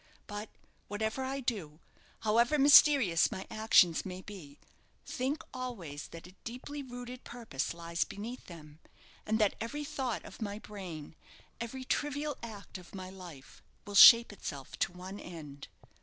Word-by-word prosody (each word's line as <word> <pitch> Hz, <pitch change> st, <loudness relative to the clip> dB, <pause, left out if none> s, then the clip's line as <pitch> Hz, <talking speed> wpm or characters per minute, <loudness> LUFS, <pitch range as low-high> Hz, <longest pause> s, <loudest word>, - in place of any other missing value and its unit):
But, 205 Hz, 0 st, -6 dB, 0.4 s
whatever 220 Hz, +5 st, -2 dB
I 270 Hz, +1 st, -3 dB
do, 185 Hz, -, -3 dB, 0.4 s
however 235 Hz, +6 st, +3 dB
mysterious 275 Hz, -, +7 dB
my 190 Hz, -, -5 dB
actions 215 Hz, -6 st, +4 dB
may 185 Hz, -1 st, -7 dB
be, 160 Hz, -9 st, -10 dB, 0.5 s
think 270 Hz, +5 st, -2 dB
always 190 Hz, -, -6 dB
that 165 Hz, -1 st, -11 dB
a 180 Hz, -, -12 dB
deeply 255 Hz, +5 st, -6 dB
rooted 245 Hz, -1 st, -8 dB
purpose 230 Hz, -, -4 dB
lies 170 Hz, 0 st, -2 dB
beneath 230 Hz, +5 st, -8 dB
them; 155 Hz, -3 st, -12 dB, 0.5 s
and 220 Hz, +1 st, +2 dB
that 210 Hz, -3 st, +3 dB
every 290 Hz, +6 st, -3 dB
thought 260 Hz, -5 st, -3 dB
of -, -, -12 dB
my 205 Hz, -1 st, -3 dB
brain 185 Hz, -9 st, -8 dB, 0.5 s
every 235 Hz, +3 st, -5 dB
trivial 295 Hz, +2 st, -1 dB
act 210 Hz, -4 st, -8 dB
of 180 Hz, +2 st, -13 dB
my 185 Hz, -1 st, -7 dB
life, 175 Hz, -8 st, -12 dB, 0.2 s
will 205 Hz, -, -8 dB
shape 230 Hz, +2 st, +10 dB
itself 140 Hz, -8 st, -7 dB
to -, -, +1 dB
one 185 Hz, +3 st, -8 dB
end." 150 Hz, -5 st, -9 dB
210 Hz, 145 wpm, -32 LUFS, 175-245 Hz, 0.5 s, shape